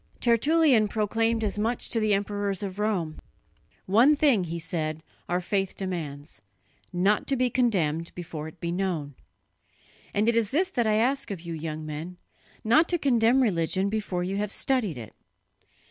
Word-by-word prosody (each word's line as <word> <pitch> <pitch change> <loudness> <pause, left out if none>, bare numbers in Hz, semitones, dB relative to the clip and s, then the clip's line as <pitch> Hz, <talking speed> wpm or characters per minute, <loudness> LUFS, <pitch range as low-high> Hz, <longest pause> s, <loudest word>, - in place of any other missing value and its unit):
Tertullian 255 -1 +4
proclaimed 225 +2 0
as 210 -1 -1
much 230 +3 -1
to 230 - +1
the 215 -1 +1
emperors 205 0 -1
of 195 0 -5
Rome. 185 -7 -1 0.7
'One 235 +10 +5
thing,' 270 -11 +3
he 170 0 -4
said, 155 -1 -3 0.3
'our 175 +1 +1
faith 195 +1 -2
demands: 160 -6 -5 0.5
not 195 +4 +1
to 275 - +2
be 250 -1 +1
condemned 170 -10 +1
before 160 -3 -6
it 160 +2 -12
be 170 - -3
known,' 175 -6 -2 1.0
and 210 +2 +1
it 235 - +3
is 225 -3 +2
this 365 - +1
that 240 -8 0
I 215 - +3
ask 250 +4 +1
of 195 -5 -5
you, 170 -1 -6
young 155 -1 -5
men, 155 +4 -6 0.5
not 240 +10 +4
to 350 - +1
condemn 255 -3 +3
religion 190 -1 0
before 200 -4 -2
you 190 +2 -2
have 205 0 -2
studied 225 - 0
it." 115 -3 -9
200 Hz, 165 wpm, -26 LUFS, 170-230 Hz, 1.0 s, One